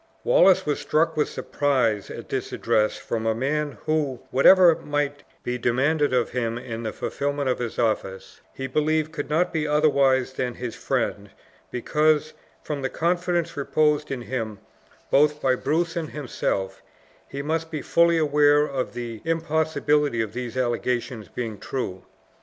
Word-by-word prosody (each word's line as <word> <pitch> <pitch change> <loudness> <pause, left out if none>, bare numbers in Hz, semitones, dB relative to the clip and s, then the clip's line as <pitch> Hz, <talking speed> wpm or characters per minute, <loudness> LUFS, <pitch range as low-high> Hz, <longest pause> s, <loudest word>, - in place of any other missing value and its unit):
Wallace 335 - +5
was 150 -1 -1
struck 160 +1 +1
with 150 - +1
surprise 125 -8 0
at - - -8
this - - -3
address 110 0 +1
from 115 -1 -3
a 110 - +2
man 145 +4 -1
who, 150 -5 0
whatever 175 +5 +7
might 145 -1 -2 0.2
be 125 0 -3
demanded 140 +6 +1
of 125 -2 +1
him 115 -2 -2
in 115 -2 -6
the 110 -2 -3
fulfillment 140 +3 -2
of 125 - 0
his 120 -2 -4
office, 105 -4 -2
he 135 - -6
believed 155 +3 0
could 150 -3 -5
not 170 +4 +1
be 155 -2 0
otherwise 140 -4 +3
than 125 -2 -3
his 120 -2 -5
friend - - -2 0.4
because, 155 +4 +1 0.3
from 145 -2 -4
the 135 - -1
confidence 175 0 0
reposed 150 +1 +1
in 130 -3 -4
him 115 -5 -4 0.5
both 150 +1 +4
by 130 -3 +2
Bruce 165 +6 -1
and 165 -2 -3
himself, 100 -9 -3 0.5
he 140 0 -5
must 160 +2 -2
be 155 -3 -5
fully 170 0 +3
aware 150 -1 +4
of 135 -3 -4
the 120 -2 -6
impossibility 160 -4 +1
of 110 -2 -2
these 125 0 -5
allegations 120 -1 -1
being 115 -4 -5
true. 95 -8 -4
140 Hz, 155 wpm, -24 LUFS, 120-155 Hz, 0.5 s, whatever